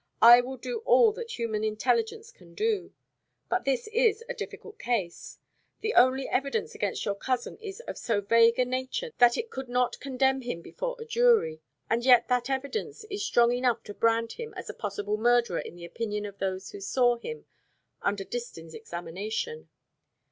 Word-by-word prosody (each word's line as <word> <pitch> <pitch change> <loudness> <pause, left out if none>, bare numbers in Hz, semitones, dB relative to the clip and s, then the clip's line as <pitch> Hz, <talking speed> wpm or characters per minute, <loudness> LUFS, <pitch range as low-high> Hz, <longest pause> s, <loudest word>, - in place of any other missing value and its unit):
I 240 +1 +10
will 260 +2 -7
do 460 - -4
all 480 -1 +5
that 465 +2 -7
human 220 -3 -2
intelligence 440 - 0
can - - -19
do. 430 -2 -1 0.6
But 365 - 0
this 270 -2 0
is 455 -1 +3
a - - -3
difficult 445 -2 -8
case. 200 -8 -3 0.4
The 445 0 -1
only 260 +2 +4
evidence 280 - -1
against 435 - -2
your 205 - 0
cousin 245 - -3
is 410 0 -8
of 485 - -7
so 225 -4 0
vague 230 +3 +4
a 255 - +3
nature 260 - -3
that 240 -1 +6
it 465 0 -4
could 265 -1 -6
not 250 0 0
condemn 265 0 +1
him 240 -9 -5
before - - -4
a 460 - -7
jury; 460 - +3 0.3
and 235 +1 0
yet 250 -1 +6
that 250 0 +1
evidence 280 +12 -3
is 405 0 -3
strong 240 -10 +4
enough 245 -1 +1
to 205 - -8
brand 230 +1 +1
him 455 -3 -8
as 370 - -6
a - - -16
possible 205 0 -3
murderer 235 -4 +2
in - - -7
the 175 0 -9
opinion 210 +3 -4
of 200 -1 -9
those 190 0 -3
who 200 - -9
saw 245 +4 +2
him 465 - -7 0.6
under 200 -1 -1
Distin's 190 -8 -7
examination. 200 - -5
250 Hz, 180 wpm, -28 LUFS, -, 0.6 s, I